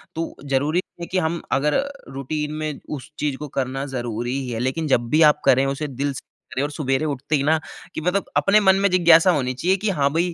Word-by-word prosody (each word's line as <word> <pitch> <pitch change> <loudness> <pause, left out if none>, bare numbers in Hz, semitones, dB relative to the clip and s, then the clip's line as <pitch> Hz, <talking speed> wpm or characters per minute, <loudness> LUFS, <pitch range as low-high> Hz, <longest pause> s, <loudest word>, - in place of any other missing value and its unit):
तो 165 +1 -4
ज़रूरी 145 +5 +1 0.2
है - - -3
कि 185 - 0
हम 170 0 -1
अगर 145 +3 +2
अ, 280 - 0 0.2
रूटीन 150 +3 -4
में 155 -2 -4 0.2
उस 135 - -12
चीज़ 145 -3 -1
को 150 - -6
करना 135 0 -3
ज़रूरी 120 +2 -3
ही 130 -2 -5
है 115 -2 -3
लेकिन 135 +6 -1
जब 120 -4 +1
भी 155 +5 +3
आप - - -29
करें 130 +2 +5
उसे 135 +2 -2
दिल 140 +1 -2
से - - -6
करें। - - -59 0.3
और 145 - -2
सवेरे 145 -1 -1
उठते 145 +1 -1
ही 140 - +1
ना, 160 +2 +3 0.3
कि - - -4
मतलब 180 +4 0
अपने 210 +2 +5
मन 190 -2 +5
में 200 0 +3
जिज्ञासा 170 -1 +6
होनी 130 -6 0
चाहिए 180 +9 +1
कि 210 +2 -1
हाँ, 145 -7 +2
भई 170 +2 0
150 Hz, 240 wpm, -22 LUFS, 135-165 Hz, 0.3 s, जिज्ञासा